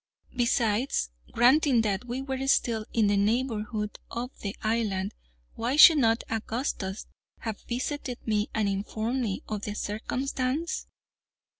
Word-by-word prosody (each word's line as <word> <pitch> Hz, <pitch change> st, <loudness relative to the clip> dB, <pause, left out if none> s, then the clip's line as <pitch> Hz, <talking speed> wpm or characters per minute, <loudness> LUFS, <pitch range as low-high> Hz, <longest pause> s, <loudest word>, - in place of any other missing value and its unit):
Besides, 235 Hz, -, +1 dB, 0.2 s
granting 255 Hz, 0 st, +5 dB
that 210 Hz, +1 st, -1 dB
we 250 Hz, +2 st, -4 dB
were 270 Hz, 0 st, -3 dB
still 225 Hz, -5 st, +2 dB
in 225 Hz, -2 st, +3 dB
the 205 Hz, 0 st, +3 dB
neighborhood 215 Hz, -1 st, -1 dB
of 240 Hz, +2 st, -4 dB
the 200 Hz, -1 st, -4 dB
island, 215 Hz, -3 st, 0 dB, 0.4 s
why 240 Hz, +4 st, -1 dB
should 305 Hz, +1 st, +9 dB
not 225 Hz, -2 st, +3 dB
Augustus 220 Hz, -3 st, -3 dB, 0.4 s
have 220 Hz, -3 st, -4 dB
visited 255 Hz, +1 st, -3 dB
me 210 Hz, -1 st, 0 dB
and 215 Hz, -2 st, 0 dB
informed 220 Hz, +5 st, -2 dB
me 205 Hz, -5 st, -2 dB
of 210 Hz, -2 st, -3 dB
the 205 Hz, 0 st, -4 dB
circumstance? 255 Hz, +8 st, -2 dB
230 Hz, 130 wpm, -28 LUFS, 210-255 Hz, 0.4 s, should